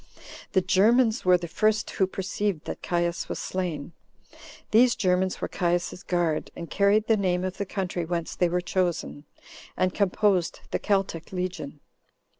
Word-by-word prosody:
The 190 - +4
Germans 220 +6 +3
were 180 0 +6
the 175 -1 -6
first 215 +5 +1
who 190 -3 +1
perceived 190 -2 -2
that - - -6
Caius 175 -1 -1
was - - -3
slain. 175 -5 -3 0.8
These 235 +3 +5
Germans 185 0 +1
were - - -1
Caius's 175 0 -1
guard, 170 -3 0
and 170 -3 -8
carried 205 +2 +3
the 225 - +4
name 185 -3 0
of 185 0 -3
the 200 - -3
country 185 -3 -2
whence 170 0 -3
they 175 - +2
were 180 +1 0
chosen, 175 - -2 0.5
and 185 0 +1
composed 195 -2 +1
the - - 0
Celtic 195 -5 -1
legion. 180 -6 -4
185 Hz, 155 wpm, -26 LUFS, 175-200 Hz, 0.8 s, were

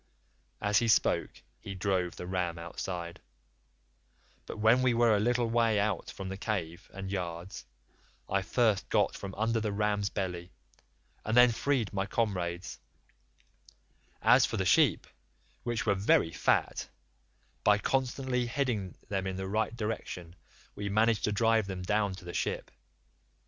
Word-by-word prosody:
"As 105 +1 +3
he 120 - 0
spoke 110 - +1 0.2
he 100 - -7
drove 90 -2 -1
the - - -7
ram 90 -2 -2
outside, 85 0 -6 1.3
but - - -6
when 110 +4 +4
we 125 -2 +3
were 115 -2 +4
a - - +2
little 120 +2 +1
way 115 -2 +2
out 100 -3 -1
from 95 - -7
the 95 0 -5
cave 90 -6 -4
and 95 0 -6
yards, 90 -3 -5 0.6
I 100 0 +1
first 110 0 +1
got - - +2
from 95 -1 -7
under 115 +2 +1
the 110 -1 -2
ram's 105 -1 0
belly, 90 -3 -4 0.7
and 110 +2 0
then 125 0 +8
freed 120 -3 0
my 95 0 -1
comrades; 90 -7 -2 1.4
as - - +6
for - - 0
the - - 0
sheep, - - +4 0.6
which 120 -2 -2
were 105 - +3
very 95 -4 +3
fat, - - 0 0.7
by 105 0 +5
constantly 130 +1 -1
heading 120 -7 -2
them 95 -1 -2
in 95 - -3
the 95 0 -4
right 110 +3 -1
direction 105 -6 -5 0.4
we 100 0 -4
managed 110 0 +2
to 105 - 0
drive 110 0 +2
them 95 -2 -5
down 100 0 0
to 95 - -12
the 85 - -7
ship. - - -2
100 Hz, 150 wpm, -30 LUFS, 95-115 Hz, 1.4 s, then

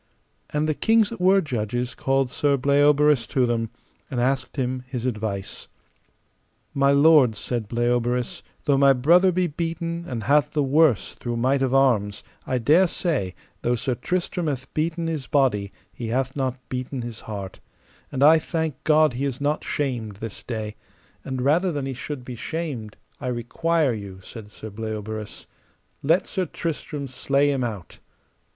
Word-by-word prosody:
And 150 +1 0
the 155 - +2
kings 225 +5 +3
that 230 - -7
were 190 +2 +5
judges 120 - -2
called 135 -1 0
Sir 140 -1 +2
Bleoberis 145 0 +4
to 130 -3 +2
them, 115 -2 -1 0.4
and 130 - -2
asked 130 +1 0
him 130 -2 -2
his 125 -2 -4
advice. 105 -5 -3 1.1
My 140 0 +3
lords, 140 -6 +5
said 120 -2 -3
Bleoberis, 120 +1 0 0.2
though 140 -2 +3
my 140 0 +6
brother 170 +9 +5
be 180 +1 +1
beaten, 170 +1 -3
and 115 -4 -4
hath 145 +2 +3
the 150 -2 +2
worse 140 -3 +3
through 120 -1 -4
might 130 +3 +2
of 135 0 +1
arms, 110 -7 +2 0.2
I 130 - +1
dare 155 +10 +4
say, 140 - -1 0.3
though 120 +1 +1
Sir 125 +2 -1
Tristram 175 - -2
hath 130 -3 -4
beaten 165 +2 -1
his 160 -5 -3
body 120 -9 +1 0.2
he 120 - -5
hath 130 +3 -1
not 130 -2 -1
beaten 130 0 -4
his 115 -2 -6
heart, 100 -3 -7 0.5
and 135 0 0
I 160 +2 +8
thank 160 -4 -3
God 155 -2 +4
he 130 +3 -2
is 130 -3 -3
not 145 +2 0
shamed 120 -8 -2
this 110 +1 -7
day; 110 -3 -5 0.5
and 130 -2 -3
rather 170 +7 +3
than 145 -3 -3
he 135 - -3
should 130 0 -6
be 125 - -6
shamed 130 -6 -5 0.2
I 130 - -5
require 135 +5 0
you, 100 -3 -7
said 110 +1 -9 0.3
Bleoberis, 110 -1 -5 0.6
let 165 +6 +3
Sir 185 -3 -2
Tristram 150 -3 -4
slay 140 +2 +1
him 135 -2 -1
out. 105 -7 -6
135 Hz, 160 wpm, -24 LUFS, 120-150 Hz, 1.1 s, I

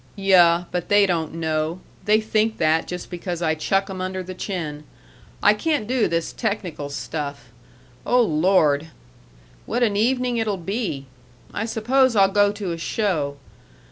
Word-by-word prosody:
"Yuh 180 -3 +4
but 180 -1 -3
they 205 0 +5
don't 165 -4 -1
know. 160 +1 -2 0.3
They 215 0 +4
think 220 0 0
that 160 +1 +2
just 180 +1 -6
because 175 -1 -4
I 160 -1 +2
chuck 195 +5 0
'em 190 -2 -6
under 185 0 -3
the 185 +1 -7
chin. 165 -6 -5 0.6
I 205 - +7
can't 290 +2 -1
do 250 0 +1
this 165 -1 -2
technical 180 -8 -3
stuff.... 140 -4 -5 0.5
Oh, 250 0 +3
Lord! 160 -4 +2 0.8
what 240 +2 0
an 210 -4 +1
evening 245 +3 +1
it'll 215 -3 0
be!... 185 - -3 0.5
I 210 - -2
suppose 250 +3 +2
I'll 195 -2 +5
go 205 0 +4
to 205 -3 -4
a 165 - -4
show. 165 -7 -1
185 Hz, 155 wpm, -22 LUFS, 160-215 Hz, 0.8 s, I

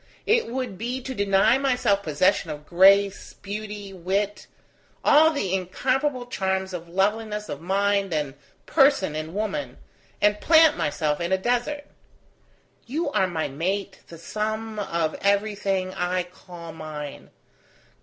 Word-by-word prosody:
It 460 +2 +3
would 245 -5 -4
be 245 +3 -3
to 260 +1 -6
deny 200 +3 +3
myself 245 -7 +1
possession 180 +2 +1
of 150 -1 -7
grace, 195 +3 +4
beauty, 205 -1 -7
wit, 195 +3 -2 0.6
all 310 +2 +7
the 205 - -2
incomparable 255 +8 -1
charms 190 -4 -2
of 170 -1 -6
loveliness 210 +3 -1
of 145 - -5
mind 200 +2 +1
and 150 -4 -1 0.3
person 270 - +3
in 155 +3 -5
woman, 165 - -3 0.4
and 210 0 +2
plant 320 -2 +6
myself 150 +1 -1
in 170 +2 -2
a 190 - +4
desert. 245 +8 -1 1.0
You 295 +4 -2
are 190 -6 +2
my 165 -3 -2
mate, 185 +7 -3
the 170 - -11
sum 215 +5 -4
of 165 -5 -1
everything 200 -2 0
I 180 0 -1
call 175 -2 -11
mine. 155 -2 -8
195 Hz, 135 wpm, -25 LUFS, 175-220 Hz, 1.0 s, all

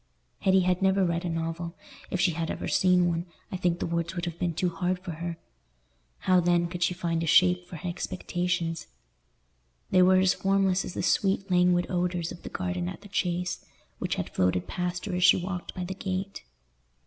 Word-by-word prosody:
Hetty 190 -1 +4
had 180 0 +1
never 190 0 +3
read 170 +1 -1
a - - -1
novel; 165 +1 -3 0.3
if 185 - -2
she 180 - +3
had 165 0 -3
ever - - -4
seen 180 -1 +4
one, 170 +1 -1 0.2
I - - -3
think 175 -2 +1
the - - -2
words 170 +1 -2
would 175 -1 -2
have 170 -1 -5
been 175 -2 -1
too 180 - +1
hard 180 +1 -1
for 180 -1 -7
her; 165 +1 -5 0.8
how 185 -1 +4
then 175 0 +3
could 175 +1 -6
she 175 +1 +2
find 170 -2 -1
a 165 - -2
shape 180 +2 +4
for 180 - -9
her 165 +3 -6
expectations? 175 -1 -2 1.0
They 185 - +5
were 185 +1 +6
as 185 0 +4
formless 195 -1 +2
as - - -7
the - - -2
sweet 195 +1 +1
languid 180 0 +4
odours 175 -2 -1
of 175 - -9
the - - -7
garden 90 -1 -2
at - - -8
the 205 - -13
Chase, 180 -2 -1 0.4
which - - -1
had - - -4
floated 90 -1 +1
past 180 - -3
her 200 - -4
as 180 0 0
she 180 - +7
walked 180 0 -5
by 185 - -3
the 180 +2 -4
gate. 190 +1 -4
180 Hz, 205 wpm, -28 LUFS, 170-185 Hz, 1.0 s, she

